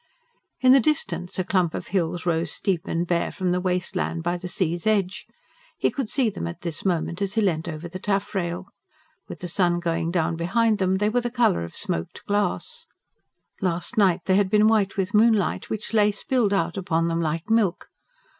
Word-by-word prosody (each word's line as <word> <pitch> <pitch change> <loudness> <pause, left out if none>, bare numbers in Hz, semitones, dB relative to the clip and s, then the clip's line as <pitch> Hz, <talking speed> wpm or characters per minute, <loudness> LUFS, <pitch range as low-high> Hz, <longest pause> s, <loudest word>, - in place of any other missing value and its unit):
In 255 -1 +6
the 270 - +8
distance 190 - -1
a 185 - +1
clump 180 -3 +1
of - - -6
hills 175 -2 -1
rose 165 -1 0
steep 190 -2 -1
and 170 +1 -1
bare 170 -1 0
from 185 -3 -1
the 180 0 0
waste 180 +1 -1
land 170 -2 -2
by 175 +1 0
the 180 +1 -6
sea's 175 0 -1
edge 200 -3 0 0.5
he - - +1
could 270 -7 -3
see 265 -3 +2
them 85 - -5
at 85 - -7
this 165 -4 -4
moment 175 -1 -1
as 200 +1 -1
he 225 - +3
leant 170 -5 0
over 160 +1 -5
the 185 +2 -7
taffrail: 190 -3 -2 0.6
with - - -9
the 180 - -3
sun 175 0 +1
going 165 -1 -1
down 170 -1 0
behind 215 +6 +1
them 190 0 +2
they 210 +2 +1
were 245 +3 +1
the 240 - -2
colour 235 - +2
of 85 - -8
smoked 80 0 -3
glass. 205 - -1 0.7
Last 180 +4 -1
night 190 -5 +3
they 190 0 +3
had 200 -2 +2
been 210 +1 +4
white 210 -3 +2
with 195 0 -1
moonlight, 215 -2 +3
which 220 +1 -4
lay 210 -1 +5
spilled 220 0 0
out 170 -4 0
upon 165 -3 0
them 165 0 0
like 165 +1 -2
milk. 215 -6 +2
185 Hz, 200 wpm, -24 LUFS, 170-210 Hz, 0.7 s, the